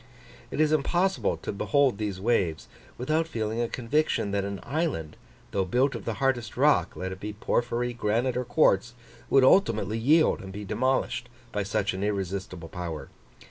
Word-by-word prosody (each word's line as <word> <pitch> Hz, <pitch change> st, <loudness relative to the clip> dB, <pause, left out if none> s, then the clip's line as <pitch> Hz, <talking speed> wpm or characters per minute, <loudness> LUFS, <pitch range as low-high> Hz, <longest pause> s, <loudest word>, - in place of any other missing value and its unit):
It -, -, -5 dB
is 155 Hz, -1 st, +4 dB
impossible 175 Hz, +6 st, +1 dB
to -, -, -5 dB
behold 130 Hz, +3 st, +2 dB
these 105 Hz, -3 st, -3 dB
waves 95 Hz, -7 st, 0 dB, 0.3 s
without 155 Hz, +6 st, 0 dB
feeling 110 Hz, -5 st, -2 dB
a 120 Hz, -, 0 dB
conviction 125 Hz, -3 st, 0 dB
that 100 Hz, -1 st, 0 dB
an 100 Hz, -1 st, -4 dB
island, 140 Hz, -, -2 dB, 0.4 s
though 95 Hz, -, +1 dB
built 125 Hz, +9 st, +1 dB
of -, -, -7 dB
the -, -, -2 dB
hardest 130 Hz, -5 st, -1 dB
rock, 145 Hz, +3 st, +3 dB
let 95 Hz, 0 st, -4 dB
it 95 Hz, -, -7 dB
be 105 Hz, +1 st, -5 dB
porphyry, 120 Hz, +3 st, -1 dB
granite, 120 Hz, +2 st, 0 dB
or 125 Hz, -, 0 dB
quartz, 120 Hz, -2 st, +2 dB, 0.3 s
would 135 Hz, -, +5 dB
ultimately 115 Hz, -, +3 dB
yield 155 Hz, +7 st, +4 dB
and 95 Hz, -, -8 dB
be 105 Hz, +2 st, -7 dB
demolished 125 Hz, +2 st, 0 dB, 0.2 s
by 105 Hz, -, -1 dB
such 100 Hz, 0 st, -1 dB
an 95 Hz, +1 st, -3 dB
irresistible 95 Hz, -4 st, -3 dB
power. 85 Hz, -6 st, -6 dB
115 Hz, 170 wpm, -27 LUFS, 100-135 Hz, 0.4 s, would